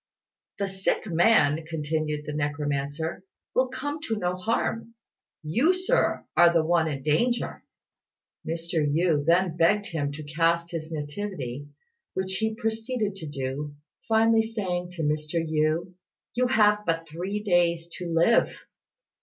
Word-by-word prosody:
"The 200 Hz, -, -1 dB
sick 190 Hz, +2 st, -1 dB
man," 165 Hz, -4 st, +4 dB
continued 155 Hz, -1 st, -2 dB
the 150 Hz, -, -4 dB
necromancer, 145 Hz, +2 st, -2 dB, 0.3 s
"will 255 Hz, +1 st, +3 dB
come 290 Hz, +4 st, -4 dB
to 225 Hz, -, 0 dB
no 180 Hz, -2 st, -1 dB
harm; 225 Hz, +3 st, -2 dB, 0.5 s
you, 245 Hz, -, +3 dB
Sir, 375 Hz, +7 st, +1 dB
are 175 Hz, -1 st, +7 dB
the 165 Hz, -2 st, +2 dB
one 165 Hz, -1 st, +3 dB
in 140 Hz, -3 st, -4 dB
danger." 235 Hz, -, 0 dB, 0.8 s
Mr. 165 Hz, +1 st, -3 dB
Yü 150 Hz, 0 st, +2 dB
then 170 Hz, +2 st, +3 dB
begged 205 Hz, +5 st, +3 dB
him 150 Hz, -7 st, -2 dB
to 155 Hz, +2 st, -7 dB
cast 165 Hz, +3 st, +1 dB
his 165 Hz, -1 st, -5 dB
nativity, 145 Hz, -3 st, -5 dB, 0.5 s
which 190 Hz, 0 st, -2 dB
he 220 Hz, 0 st, -1 dB
proceeded 225 Hz, -1 st, -2 dB
to 160 Hz, -, -7 dB
do, 145 Hz, +1 st, -4 dB, 0.3 s
finally 225 Hz, 0 st, +4 dB
saying 190 Hz, -6 st, -3 dB
to 165 Hz, -2 st, -4 dB
Mr. 150 Hz, +2 st, -1 dB
Yü, 160 Hz, +2 st, 0 dB, 0.4 s
"You 250 Hz, +1 st, +2 dB
have 210 Hz, -4 st, +4 dB
but 165 Hz, -3 st, -1 dB
three 185 Hz, +7 st, -4 dB
days 170 Hz, -3 st, +2 dB
to 180 Hz, -, -4 dB
live!" 170 Hz, +8 st, +3 dB
170 Hz, 135 wpm, -26 LUFS, 155-210 Hz, 0.8 s, are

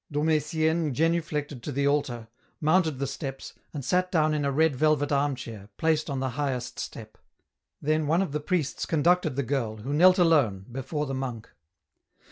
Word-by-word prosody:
Dom 150 Hz, +2 st, 0 dB
Etienne 160 Hz, 0 st, +1 dB
genuflected 155 Hz, -4 st, -1 dB
to 145 Hz, -, -5 dB
the 140 Hz, +1 st, 0 dB
altar, 130 Hz, -5 st, 0 dB, 0.3 s
mounted 160 Hz, -2 st, +2 dB
the 140 Hz, -, -1 dB
steps, 135 Hz, -1 st, -6 dB, 0.2 s
and 140 Hz, -4 st, -6 dB
sat 180 Hz, +5 st, +1 dB
down 155 Hz, -3 st, +2 dB
in 150 Hz, -1 st, 0 dB
a 140 Hz, -, +1 dB
red 155 Hz, +1 st, +2 dB
velvet 150 Hz, +1 st, +2 dB
arm 140 Hz, 0 st, +2 dB
chair, 110 Hz, -5 st, -9 dB
placed 160 Hz, -1 st, +1 dB
on 140 Hz, -2 st, -2 dB
the 130 Hz, -1 st, -1 dB
highest 130 Hz, -2 st, -3 dB
step. 110 Hz, -1 st, -8 dB, 0.6 s
Then 155 Hz, +1 st, 0 dB
one 165 Hz, +5 st, +3 dB
of 185 Hz, -, -5 dB
the 150 Hz, -, -1 dB
priests 150 Hz, -1 st, -1 dB
conducted 170 Hz, -2 st, +2 dB
the 140 Hz, -, 0 dB
girl, 120 Hz, -4 st, -2 dB
who 125 Hz, +7 st, -4 dB
knelt 180 Hz, +5 st, +6 dB
alone, 140 Hz, -, +3 dB
before 135 Hz, +4 st, -3 dB
the 135 Hz, -, -4 dB
monk. 125 Hz, -4 st, -5 dB
145 Hz, 180 wpm, -27 LUFS, 130-160 Hz, 0.6 s, knelt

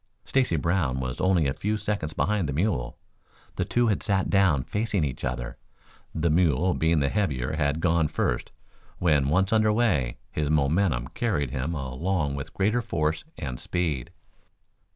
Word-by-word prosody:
Stacy 130 Hz, -10 st, +1 dB
Brown 80 Hz, -5 st, 0 dB
was 65 Hz, -1 st, -4 dB
only 95 Hz, -4 st, +3 dB
a 70 Hz, -, +1 dB
few 105 Hz, +7 st, -1 dB
seconds 100 Hz, -7 st, -2 dB
behind 100 Hz, -5 st, 0 dB
the -, -, -1 dB
mule. 75 Hz, -, -1 dB, 0.6 s
The -, -, -1 dB
two 120 Hz, 0 st, +1 dB
had 105 Hz, -, 0 dB
sat 95 Hz, -1 st, 0 dB
down 95 Hz, -9 st, +3 dB
facing 105 Hz, -, -1 dB
each 65 Hz, -3 st, -3 dB
other. -, -, -3 dB, 0.6 s
The 80 Hz, 0 st, +1 dB
mule 85 Hz, +1 st, +3 dB
being 80 Hz, -1 st, +2 dB
the 70 Hz, -, +2 dB
heavier 70 Hz, -11 st, -1 dB
had 75 Hz, 0 st, 0 dB
gone 85 Hz, -2 st, +2 dB
first -, -, -1 dB
and, -, -, -33 dB
when 75 Hz, -6 st, +2 dB
once 95 Hz, +6 st, +2 dB
under 110 Hz, -1 st, +4 dB
way, 95 Hz, -, +1 dB
his 75 Hz, -1 st, -1 dB
momentum 75 Hz, -3 st, +1 dB
carried 75 Hz, -, -1 dB
him 70 Hz, +6 st, -2 dB
along 75 Hz, +3 st, -1 dB
with 70 Hz, +1 st, -5 dB
greater 110 Hz, +5 st, +2 dB
force 80 Hz, -8 st, -1 dB
and 60 Hz, -2 st, -5 dB
speed. 80 Hz, -8 st, -2 dB
80 Hz, 165 wpm, -26 LUFS, 70-95 Hz, 0.6 s, under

